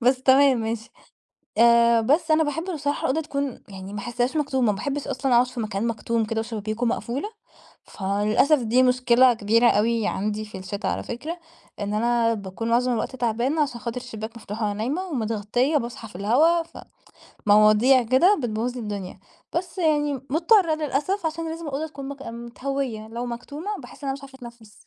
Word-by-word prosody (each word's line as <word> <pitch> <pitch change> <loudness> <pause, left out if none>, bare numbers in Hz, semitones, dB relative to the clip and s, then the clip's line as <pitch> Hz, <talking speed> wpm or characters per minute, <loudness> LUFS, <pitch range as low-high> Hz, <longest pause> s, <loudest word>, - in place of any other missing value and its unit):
بس 255 +2 +2
تمام، 265 -1 +5
ماشي. 225 +1 -4 0.7
آآ، 235 0 +5
بس 310 +8 +2
أنا 315 +1 +4
باحب 305 +2 -2
بصراحة 290 -1 -2
الأوضة 315 +5 0
تكون 280 -4 -4
يعني 195 0 -9
ما 210 - -4
أحسهاش 245 +5 -1
مكتومة، 265 -5 +1
ما - - -3
باحبش 280 +7 -3
أصلًا 260 0 0
أقعد 245 +1 +5
في 250 -1 -8
مكان 215 +1 -2
مكتوم 230 0 -1
كده 220 +1 -2
وشبابيكه 220 +1 -3
مقفولة، 250 - -2 0.6
فللأسف، 210 +9 +2
دي 235 +3 +3
مشكلة 250 0 +4
كبيرة 225 +3 +3
أوي 225 +1 +1
عندي 215 +2 -2
في 210 -2 -9
الشتاء 190 +2 -3
على - - -3
فكرة، 310 +9 -6 0.4
إن 205 +1 -2
أنا 230 +1 +2
باكون 200 +2 -5
معظم 245 +2 +2
الوقت 240 +3 -2
تعبانة، 245 +6 0
عشان 240 -5 -3
خاطر 235 +3 -5
الشباك 225 -2 -8
مفتوح 220 0 -7
وأنا 205 -1 +1
نايمة 255 - -2
ومتغطية 240 - 0
باصحى 235 -4 -4
في 175 - -11
الهواء 300 - +3
ف 330 - -14 0.7
مواضيع 215 +5 +6
كده، 265 - +4
بتبوظ 235 +1 -2
لي 250 - -5
الدنيا. 200 -4 -6 0.3
بس 350 +2 -3
يعني 295 -4 +2 0.2
مضطرة 335 - +4
للأسف، 310 +5 -1
عشان 325 +1 -3
لازم 330 0 -6
الأوضة 290 +2 -3
تكون 280 -3 -8
مك 280 0 -8
متهوية، 235 -1 -5
لو 235 +2 -5
مكتومة 285 - -6
باحس - - -13
إن 275 - -2
أنا - - +1
مش 280 +1 -8
عارفة 270 -1 -12
أتنفس. 235 -4 -12
240 Hz, 180 wpm, -24 LUFS, 220-280 Hz, 0.7 s, مواضيع